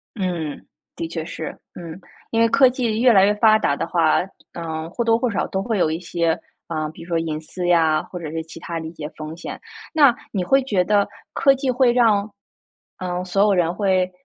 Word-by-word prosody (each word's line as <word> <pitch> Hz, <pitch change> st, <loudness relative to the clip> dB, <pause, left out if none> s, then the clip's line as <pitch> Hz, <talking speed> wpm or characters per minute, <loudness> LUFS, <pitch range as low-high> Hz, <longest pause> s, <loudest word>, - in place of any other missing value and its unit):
嗯， 175 Hz, -7 st, -3 dB, 0.3 s
的 165 Hz, -, -3 dB
确 165 Hz, -1 st, -4 dB
是。 -, -, -6 dB, 0.2 s
嗯， 170 Hz, 0 st, -9 dB, 0.3 s
因 225 Hz, -, +1 dB
为 230 Hz, -, +5 dB
科 275 Hz, 0 st, +6 dB
技 235 Hz, -3 st, -1 dB
越 245 Hz, -1 st, +6 dB
来 195 Hz, -2 st, +6 dB
越 205 Hz, +1 st, +3 dB
发 215 Hz, 0 st, +5 dB
达 140 Hz, -, +1 dB
的 -, -, -2 dB
话， 165 Hz, -2 st, +3 dB, 0.3 s
嗯， 160 Hz, -1 st, -5 dB
或 235 Hz, +6 st, -2 dB
多 225 Hz, 0 st, +3 dB
或 245 Hz, -1 st, 0 dB
少 -, -, -1 dB
都 190 Hz, 0 st, -2 dB
会 225 Hz, -2 st, -1 dB
有 160 Hz, -, +2 dB
一 160 Hz, -, -2 dB
些 170 Hz, -2 st, 0 dB, 0.3 s
啊， 155 Hz, -2 st, -3 dB
比 160 Hz, -, -11 dB
如 170 Hz, -, -12 dB
说 165 Hz, -1 st, 0 dB
隐 155 Hz, -2 st, -3 dB
私 175 Hz, +3 st, -5 dB
呀， 160 Hz, -3 st, +3 dB
或 180 Hz, -, -8 dB
者 160 Hz, -3 st, -6 dB
是 160 Hz, 0 st, -3 dB
其 160 Hz, -, -11 dB
它 170 Hz, -1 st, -5 dB
的 160 Hz, -, -6 dB
一 160 Hz, -, -7 dB
些 150 Hz, -2 st, -6 dB
风 155 Hz, +1 st, -7 dB
险。 175 Hz, -, -7 dB, 0.3 s
那 285 Hz, -6 st, +6 dB, 0.2 s
你 190 Hz, -4 st, -1 dB
会 270 Hz, +7 st, +3 dB
觉 205 Hz, -8 st, +1 dB
得 205 Hz, 0 st, +2 dB, 0.2 s
科 275 Hz, -1 st, +4 dB
技 265 Hz, -1 st, -1 dB
会 250 Hz, -1 st, +3 dB
让， 215 Hz, -4 st, +3 dB, 0.7 s
嗯， 180 Hz, 0 st, -3 dB
所 195 Hz, +2 st, +1 dB
有 205 Hz, -2 st, +3 dB
人 175 Hz, -1 st, +2 dB
会， 185 Hz, -3 st, +1 dB
180 Hz, 240 characters per minute, -21 LUFS, 165-225 Hz, 0.7 s, 科